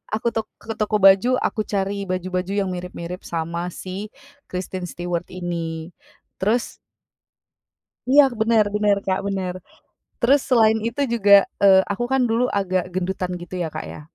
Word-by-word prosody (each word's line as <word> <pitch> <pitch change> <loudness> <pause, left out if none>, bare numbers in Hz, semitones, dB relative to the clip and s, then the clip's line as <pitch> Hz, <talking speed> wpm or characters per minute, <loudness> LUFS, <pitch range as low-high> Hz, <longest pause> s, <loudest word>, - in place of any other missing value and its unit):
Aku 235 +2 0
tok 220 -1 -2
ke 225 - -5
toko 215 0 +1
baju, 195 +7 +6
aku 215 - -1
cari 200 0 -1
baju-baju 185 0 -2
yang 200 -2 0
mirip-mirip 180 0 -6
sama 170 +1 -3
si 195 +3 -6 0.4
Kristen 185 0 -4
Stewart 175 0 -4
ini, 170 -2 -5 0.5
terus 225 +5 0 1.3
Iya, 290 +2 +7 0.2
bener 220 -1 +4
bener 210 -1 +3
Kak, 190 0 +1
bener. 190 -2 -2 0.7
Terus 270 +4 +4
selain 220 -3 +5
itu 235 +5 -3
juga, 205 -3 +3 0.3
eee, 190 -1 +7
aku 240 +5 -2
kan 265 - +3
dulu 230 +2 +2
agak 185 -2 0
gendutan 185 0 -2
gitu 175 +1 -9
ya 160 - -2
Kak 155 - -4
ya. - - -9
190 Hz, 150 wpm, -22 LUFS, 180-215 Hz, 1.3 s, Iya